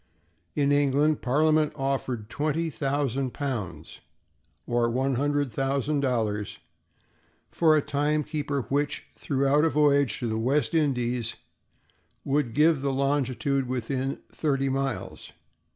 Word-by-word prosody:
In 145 -1 +2
England, 145 +1 +2
Parliament 155 +3 +2
offered 135 -5 -2
twenty 155 +4 -1
thousand 135 0 -1
pounds, 105 - -4 0.7
or 120 -1 +1
one 130 +3 0
hundred 145 +1 0
thousand 135 +4 0
dollars, 110 -6 -1 0.9
for 155 -2 +4
a 150 - +1
time 150 +2 0
keeper 145 -3 -2
which, 145 +1 0
throughout 140 +2 +1
a 165 - +4
voyage 145 -3 +3
to 120 - -3
the 110 0 -1
West 130 +5 +1
Indies, 125 -7 0 0.9
would 140 -4 0
give 155 -1 +4
the 140 0 0
longitude 135 0 0
within 130 +2 -2
thirty 135 -3 0
miles. 135 - -3
140 Hz, 120 wpm, -26 LUFS, 125-145 Hz, 0.9 s, for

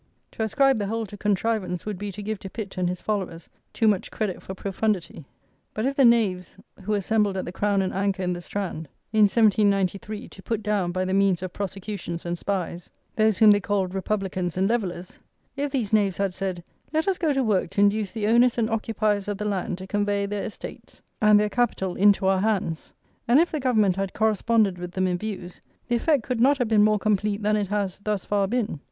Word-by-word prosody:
To - - -7
ascribe 245 +3 +3
the 205 - -2
whole 225 +2 -2
to 205 - -10
contrivance 205 -3 -1
would 210 -4 -4
be 205 0 -4
to 205 +2 -7
give 215 0 -3
to 195 - -8
Pitt 200 0 -7
and 180 -1 0
his 180 0 -4
followers 190 -6 -3 0.2
too 225 - +1
much 205 -3 +1
credit 205 -5 -3
for 190 - -7
profundity; 190 -5 -2 0.5
but 215 - -1
if 275 +1 0
the 275 - +4
knaves 200 -8 +2 0.2
who 210 +3 -1
assembled 205 0 +1
at 185 - -3
the - - -5
Crown 200 +1 +1
and 185 - -3
Anchor 195 0 -1
in 180 0 0
the 175 - -6
Strand, 175 -4 -5 0.2
in 215 -1 +6
1793, 205 -1 +1
to 195 - -13
put 220 +1 -3
down, 200 -4 0
by 185 +1 -1
the 185 - -1
means 195 -2 +2
of 185 -1 -5
prosecutions 195 -3 -5
and 175 0 -1
spies, 180 -3 -3 0.3
those 215 -2 +3
whom 215 -1 +7
they 205 - +4
called 195 -2 -1
"Republicans 190 -3 -2
and 190 +1 +2
Levellers;" 185 -6 -3 0.4
if 285 0 -2
these 235 -7 -2
knaves 200 -4 +2
had 195 -2 0
said, 185 -2 -4 0.3
"Let 315 +3 0
us 385 -2 +1
go 320 -3 +2
to 270 -2 +1
work 200 -6 +1
to 200 - 0
induce 205 0 +2
the 220 -2 -3
owners 240 +3 +4
and 225 -1 0
occupiers 215 -2 0
of 205 -1 -2
the 210 - -4
land 190 -3 -2
to 190 - -8
convey 205 0 0
their 200 0 -3
estates - - -9 0.2
and 210 -1 +6
their 210 - +2
capital 210 -5 -1
into 200 0 +4
our 190 0 +3
hands," 195 -6 -1 0.4
and 245 +5 +6
if 340 - +2
the 310 - -2
Government 215 -8 +2
had 195 -1 -2
corresponded 220 -2 +2
with 180 0 -6
them 185 0 0
in 180 -1 0
views, 190 -4 -6 0.3
the 240 - +1
effect 275 +1 +2
could 245 -1 -2
not 275 +3 +5
have 245 -3 0
been 215 -2 +5
more 215 0 +4
complete 210 0 0
than 210 +1 +2
it 205 -2 0
has, 200 -1 -2
thus 205 -2 -2
far, 200 -1 +1
been. 220 - -2
205 Hz, 220 wpm, -25 LUFS, 190-220 Hz, 0.5 s, whom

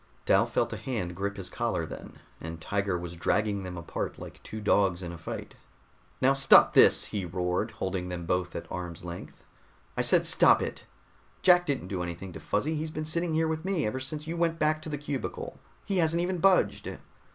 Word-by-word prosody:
Dal - - +4
felt - - 0
a - - -4
hand 105 -10 -3
grip 100 +2 -3
his 95 -2 -6
collar - - -1
then, - - -9 0.3
and 80 0 -7
Tiger 100 +1 -1
was 85 0 -6
dragging 100 +3 0
them 90 -1 -6
apart 85 - -4
like - - -10
two 110 - -7
dogs 100 -3 +2
in 85 - -5
a 85 - -8
fight. 80 - -6 0.7
"Now 135 +1 +4
stop 135 0 +6
this!" - - +6
he 100 -2 -3
roared, 90 +4 -1
holding 95 -3 -3
them 90 -1 -5
both 90 0 -1
at 85 - -4
arm's 90 -1 -6
length. 85 0 -8 0.5
"I - - +1
said - - +3
stop - - +5
it! - - -5 0.6
Jack 180 -1 +6
didn't 135 -10 -1
do 95 -3 -2
anything 85 +2 -5
to - - -7
Fuzzy, 140 +10 -1
he's 155 +1 -3
been 155 0 -4
sitting 165 +1 0
here 160 0 +2
with 160 0 -2
me 185 -5 0
ever 110 +5 -2
since 150 +3 -5
you 165 +2 -4
went 165 -1 +1
back 155 0 +1
to 155 - -6
the 150 - -3
cubicle. 145 -2 -5 0.3
He 195 - -1
hasn't 165 0 +2
even 180 0 -1
budged." 130 - +2
105 Hz, 205 wpm, -29 LUFS, -, 0.7 s, stop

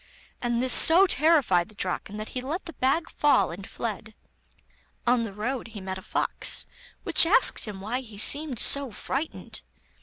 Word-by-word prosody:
and 240 0 -1
this 255 - +5
so 345 +4 +7
terrified 285 - +2
the 215 - -17
Draken 195 +2 -4
that 215 +1 -7
he 255 - -6
let 305 +9 -5
the 335 - -9
bag 295 +6 -1
fall 245 - +1
and 190 +3 -9
fled. 220 -1 -6 0.9
On 245 0 +2
the 225 -3 -5
road 230 +6 -5
he 215 - -10
met 190 0 -6
a - - -13
fox, - - 0 0.4
which - - +5
asked 335 +6 +2
him 205 -3 -8
why 225 +6 -3
he 225 -5 -12
seemed 285 +4 +3
so 280 -1 +4
frightened. 280 +8 -5
240 Hz, 175 wpm, -25 LUFS, 210-280 Hz, 0.9 s, so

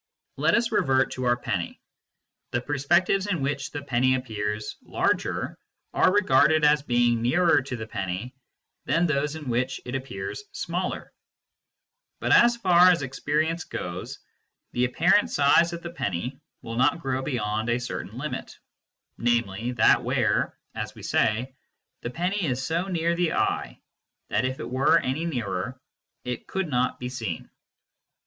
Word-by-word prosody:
Let - - +3
us 230 -1 +1
revert 130 -10 +2
to 130 - -4
our 120 0 +3
penny: 100 -8 -3 0.7
the 120 - 0
perspectives 170 +9 +1
in 190 -5 0
which 140 0 -2
the 145 -1 -6
penny 130 -1 +2
appears 105 -4 -3
larger - - -1 0.4
are - - +4
regarded 155 -5 +4
as 150 0 +5
being 120 -3 +2
nearer 165 +5 +4
to 130 -1 -5
the 110 -2 -5
penny 100 +3 -4 0.5
than 170 +2 +2
those 150 -1 0
in 155 -3 -8
which 130 +2 -1
it 125 - -6
appears 130 - -5
smaller, - - -3 1.1
but - - -1
as 235 0 +6
far 180 -4 +6
as 170 -5 +3
experience 155 +5 -1
goes 90 +1 -6 0.5
the 125 +1 +1
apparent 175 +11 +3
size 145 +4 +4
of 170 0 -7
the 170 - -5
penny 125 - -3 0.2
will 115 0 -5
not 130 +6 +3
grow 135 -2 -1
beyond 110 -4 -2
a 120 +1 +2
certain 120 -3 -6
limit, 150 +4 -5 0.6
namely, 115 -1 0
that 110 - +4
where - - +1 0.2
(as - - -5
we - - -12
say) 120 +5 +1 0.5
the 120 - -4
penny 180 +9 -1
is 130 -4 -1
so 165 +3 0
near 170 -2 0
the 175 -2 +1
eye - - -1 0.5
that - - +1
if 130 +1 -3
it - - -5
were 130 +2 +3
any 135 +6 -1
nearer 125 - -3 0.4
it 125 -1 -5
could 190 -3 -2
not 125 -1 0
be 125 - -4
seen. 115 -9 -5
130 Hz, 155 wpm, -26 LUFS, 120-165 Hz, 1.1 s, as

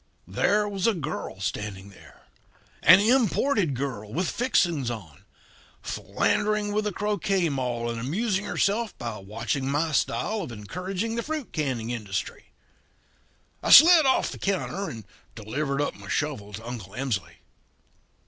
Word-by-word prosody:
"There 210 +1 +1
was 200 0 -1
a 225 - +3
girl 150 - -5
standing 100 -1 -4
there 100 - -17 0.6
an 185 +2 +8
imported 220 - +2
girl 120 -6 -4
with 175 +8 -1
fixings 170 - +1
on 95 -11 -8 0.6
philandering 210 0 0
with 210 0 0
a - - -1
croquet 195 -3 0
maul 125 -4 -2
and 115 -1 -3
amusing 190 - -1
herself 215 +2 0
by 115 -3 -5
watching 110 +7 -3
my 155 +3 0
style 215 +8 0
of 160 - -6
encouraging 180 - -4
the - - 0
fruit 305 -1 -5
canning 130 -7 -2
industry. 105 -5 -4 1.2
"I - - -2
slid 320 +1 +9
off 260 - +2
the - - -9
counter 195 0 -2
and 110 -4 -8 0.3
delivered 140 +6 -3
up 145 - -1
my - - -13
shovel 135 -9 -2
to 110 +3 -8
Uncle 110 -6 -7
Emsley. 125 -8 -3
150 Hz, 140 wpm, -26 LUFS, -, 1.2 s, slid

